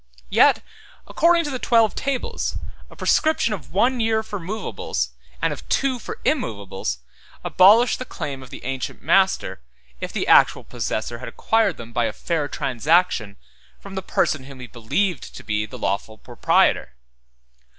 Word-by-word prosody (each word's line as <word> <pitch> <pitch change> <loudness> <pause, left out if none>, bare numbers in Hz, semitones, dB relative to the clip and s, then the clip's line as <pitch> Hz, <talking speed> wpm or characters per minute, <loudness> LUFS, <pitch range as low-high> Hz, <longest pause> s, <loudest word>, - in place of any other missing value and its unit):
Yet, - - +5 0.4
according 335 +1 +3
to 295 - -4
the 255 - -3
Twelve 230 -4 +3
Tables, 270 -2 -2 0.3
a - - -15
prescription 310 -8 +2
of 145 -9 -8
one 245 +8 +2
year 220 -1 +1
for 205 -2 -6
movables, 170 - -3 0.3
and - - 0
of - - -12
two 275 0 +2
years 250 -2 -6
for - - -7
immovables, 100 - -2 0.5
abolished 215 +6 +5
the 255 - -4
claim 140 - -6
of 130 - -12
the - - -10
ancient 135 0 -4
master, 190 - +2 0.4
if - - -5
the - - -2
actual - - +5
possessor 115 +2 -4
had 125 - -6
acquired 220 -6 +1
them 115 0 -10
by 120 - +1
a - - -2
fair 160 -4 -2
transaction 140 - +1 0.4
from 195 - -11
the 190 - -3
person 155 -5 0
whom 135 -1 -11
he 125 - -7
believed 130 - -2
to - - -9
be 105 -1 -1
the - - -9
lawful 100 +3 -2
proprietor. 60 - +1
170 Hz, 160 wpm, -22 LUFS, -, 0.5 s, Yet